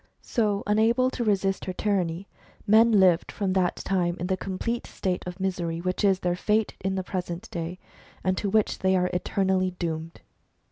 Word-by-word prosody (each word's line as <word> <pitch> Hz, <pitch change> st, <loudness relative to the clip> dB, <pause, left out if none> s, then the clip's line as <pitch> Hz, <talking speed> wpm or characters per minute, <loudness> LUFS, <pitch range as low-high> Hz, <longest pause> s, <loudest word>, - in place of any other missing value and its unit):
So, 210 Hz, -4 st, 0 dB
unable 230 Hz, +5 st, +3 dB
to 245 Hz, -, -2 dB
resist 195 Hz, -3 st, 0 dB
her 185 Hz, -, -3 dB
tyranny, 185 Hz, -2 st, -1 dB, 0.4 s
men 225 Hz, +3 st, +6 dB
lived 190 Hz, -5 st, +4 dB
from 195 Hz, -2 st, -1 dB
that 185 Hz, -2 st, +1 dB
time 175 Hz, -3 st, -1 dB
in 175 Hz, -, -2 dB
the 190 Hz, +1 st, +1 dB
complete 195 Hz, +6 st, -3 dB
state 185 Hz, -2 st, -2 dB
of 180 Hz, +1 st, -6 dB
misery, 175 Hz, -3 st, -2 dB
which 185 Hz, +4 st, -2 dB
is 195 Hz, -2 st, +3 dB
their 175 Hz, -1 st, 0 dB
fate 210 Hz, +3 st, +1 dB
in 190 Hz, 0 st, -2 dB
the 190 Hz, -, -2 dB
present 180 Hz, +1 st, -4 dB
day, 170 Hz, +1 st, -4 dB, 0.5 s
and 185 Hz, 0 st, +1 dB
to 205 Hz, -, -1 dB
which 215 Hz, +1 st, +1 dB
they 190 Hz, 0 st, +2 dB
are 180 Hz, 0 st, +1 dB
eternally 185 Hz, 0 st, +1 dB
doomed. 165 Hz, -1 st, -4 dB
190 Hz, 180 wpm, -26 LUFS, 180-205 Hz, 0.5 s, men